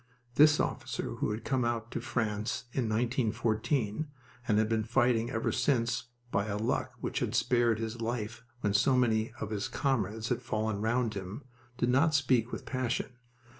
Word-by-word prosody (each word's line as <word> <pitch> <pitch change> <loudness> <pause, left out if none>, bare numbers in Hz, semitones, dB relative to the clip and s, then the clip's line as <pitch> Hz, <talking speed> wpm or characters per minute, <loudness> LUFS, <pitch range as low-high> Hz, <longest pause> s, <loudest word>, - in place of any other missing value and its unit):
This 150 +2 +6
officer - - -2
who - - 0
had 105 +2 -4
come 130 -3 +1
out 115 -1 -1
to - - -3
France 110 -3 -1
in 130 - 0
1914 115 +2 0 0.4
and 105 - +3
had 110 0 +3
been 110 0 +1
fighting 120 0 +2
ever 115 -3 0
since 120 -2 +1 0.3
by 100 +2 +1
a 100 -1 -1
luck 110 +3 -1
which - - -2
had - - -1
spared 120 -3 +3
his 115 +1 -4
life 115 0 -3 0.2
when 105 -3 +1
so 130 +6 +4
many 110 -3 +2
of 110 - -4
his 105 -2 -1
comrades 110 -5 -1
had 125 0 0
fallen 110 -3 -1
round 115 0 +1
him, 100 +7 -6 0.3
did 120 - +1
not 145 +5 +4
speak 130 -4 +2
with - - -5
passion. 130 0 -1
115 Hz, 170 wpm, -31 LUFS, 110-125 Hz, 0.4 s, This